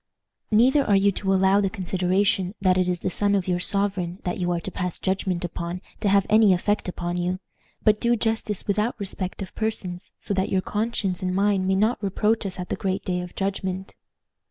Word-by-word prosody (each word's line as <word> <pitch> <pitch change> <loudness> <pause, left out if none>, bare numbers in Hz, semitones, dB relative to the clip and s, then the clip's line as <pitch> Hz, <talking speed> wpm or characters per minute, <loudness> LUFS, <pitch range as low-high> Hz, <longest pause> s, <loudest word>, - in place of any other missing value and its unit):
"Neither 255 +6 +4
are 205 - +3
you 200 +1 +4
to 195 0 -2
allow 190 +1 +4
the 195 - +1
consideration 185 0 0
that 185 -2 +3
it 180 -1 +2
is 180 -1 -2
the 185 - -1
son 205 +2 +2
of 190 -2 -1
your 180 -1 +1
sovereign 190 -2 0
that 180 - -2
you 175 -1 0
are 175 - 0
to 190 - -6
pass 180 -1 -3
judgment 185 -2 -1
upon 175 +1 -4 0.2
to 210 - +1
have 200 0 +4
any 215 -2 +6
effect 205 +4 0
upon 175 0 -3
you. 180 +1 -1 0.5
But 215 -1 +3
do 240 0 +3
justice 220 -3 -1
without 210 +3 0
respect 195 -1 -3
of 185 - -10
persons, 195 -5 -4
so - - -3
that 190 0 0
your 190 - +1
conscience 210 -3 -2
and 185 0 -1
mine 195 -1 +2
may 190 - +2
not 215 +4 +1
reproach 210 +2 +1
us 190 - -5
at 180 - -5
the - - -1
great 190 -2 -2
day 180 -1 -1
of 180 0 -9
judgment." 190 -1 -3
190 Hz, 210 wpm, -24 LUFS, 180-205 Hz, 0.5 s, any